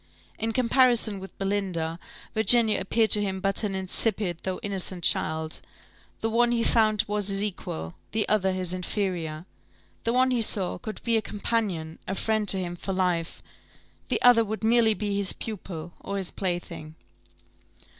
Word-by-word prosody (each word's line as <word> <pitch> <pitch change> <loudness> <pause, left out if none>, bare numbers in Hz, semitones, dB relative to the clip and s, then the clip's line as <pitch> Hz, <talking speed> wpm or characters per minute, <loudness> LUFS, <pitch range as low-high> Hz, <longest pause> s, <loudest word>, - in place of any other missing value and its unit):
In 225 +1 -1
comparison 240 -3 +3
with 190 0 -11
Belinda, 185 -5 -2 0.3
Virginia 225 0 +6
appeared 225 -2 +1
to 210 - +7
him 190 -2 -2
but 195 +1 -1
an 200 -2 -1
insipid, 190 -1 0
though 185 -1 -3
innocent 190 -3 -3
child: 160 0 +1 0.6
the 225 - 0
one 240 +1 +3
he 235 -1 +1
found 215 -3 +3
was 210 -1 -1
his 195 0 +1
equal, 80 - -5 0.2
the 220 -1 0
other 190 -3 +2
his 185 -1 -1
inferior; 180 -4 -3 0.6
the 230 - +1
one 255 +1 +3
he 245 -2 +1
saw 200 -4 0
could 215 -3 -7
be 230 -1 +2
a - - +1
companion, 200 -7 -2
a 190 - -2
friend 215 0 0
to 195 - +6
him 175 -2 -3
for 195 +2 -4
life, 180 -3 -1 0.6
the - - 0
other 245 -2 +7
would 220 +1 -5
merely 225 -1 +4
be 205 -1 -2
his 200 -1 +1
pupil, 175 -6 -7
or 200 - -4
his 190 -2 -4
plaything. 170 -4 -4
200 Hz, 165 wpm, -26 LUFS, 180-220 Hz, 0.6 s, to